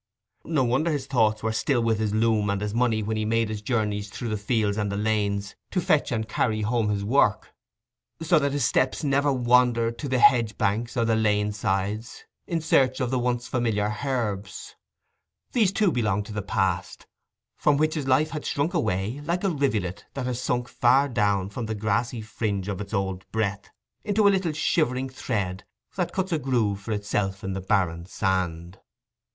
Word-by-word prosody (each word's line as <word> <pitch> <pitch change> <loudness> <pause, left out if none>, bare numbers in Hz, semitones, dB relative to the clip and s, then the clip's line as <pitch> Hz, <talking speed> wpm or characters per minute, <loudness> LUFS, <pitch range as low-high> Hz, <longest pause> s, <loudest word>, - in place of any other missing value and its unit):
No 155 -5 +1
wonder 130 +7 +1
his 145 -4 -1
thoughts 110 -5 +1
were 110 - 0
still 120 +2 +1
with 115 -2 +1
his 110 -2 0
loom 110 -1 +2
and 100 -1 0
his 105 0 -3
money 115 -2 +1
when 110 +1 -2
he 110 - -1
made 115 0 +1
his 110 -1 -4
journeys 105 -3 -1
through 115 +3 -5
the 110 - -1
fields 105 0 0
and 105 -1 -1
the 100 - -2
lanes 105 -1 -1
to 185 - 0
fetch 150 -4 +2
and 110 -2 -1
carry 110 -1 0
home 110 0 0
his 100 -1 -1
work, 105 -4 +2 0.7
so 165 0 +3
that 140 -1 0
his 140 -3 0
steps 130 +4 +1
never 140 0 +2
wandered 120 -2 +2
to 145 - -4
the 130 - +1
hedge 120 -3 +4
banks 115 +5 -1
and 115 -1 +2
the 115 - +3
lane 105 -1 +1
side 100 +1 -1 0.4
in 165 -2 -1
search 135 -4 +2
of 130 -2 -1
the 130 - +1
once 120 0 -1
familiar 105 -4 0
herbs: 105 -8 -3 0.8
these 220 -7 +3
too 200 -2 +2
belonged 105 -6 0
to 110 - -8
the 105 - -2
past, 95 -2 -2 0.5
from 145 -1 +2
which 155 +1 +2
his 150 -4 -3
life 140 +4 +3
had 150 -2 -4
shrunk 145 +6 -1
away, 110 - -1
like 170 +4 -1
a 195 - +2
rivulet 110 - -1
that 135 -2 -3
has 125 -1 -2
sunk 125 -1 -1
far 130 +4 +3
down 100 -5 +1
from 110 +3 -5
the 110 - -3
grassy 110 +3 -1
fringe 105 -3 -3
of 100 -1 -3
its 100 - -7
old 95 -3 -2
breadth 100 -3 -2 0.3
into 205 0 +3
a 200 - +5
little 185 -4 0
shivering 135 -4 0
thread, 100 -8 -3 0.3
that - - -1
cuts 190 0 -2
a 160 - +1
groove 120 -7 0
for 105 - -6
itself 100 -2 -2
in 95 - -3
the 95 - -4
barren 90 -3 0
sand. 90 -2 -2
110 Hz, 195 wpm, -25 LUFS, 105-130 Hz, 0.8 s, a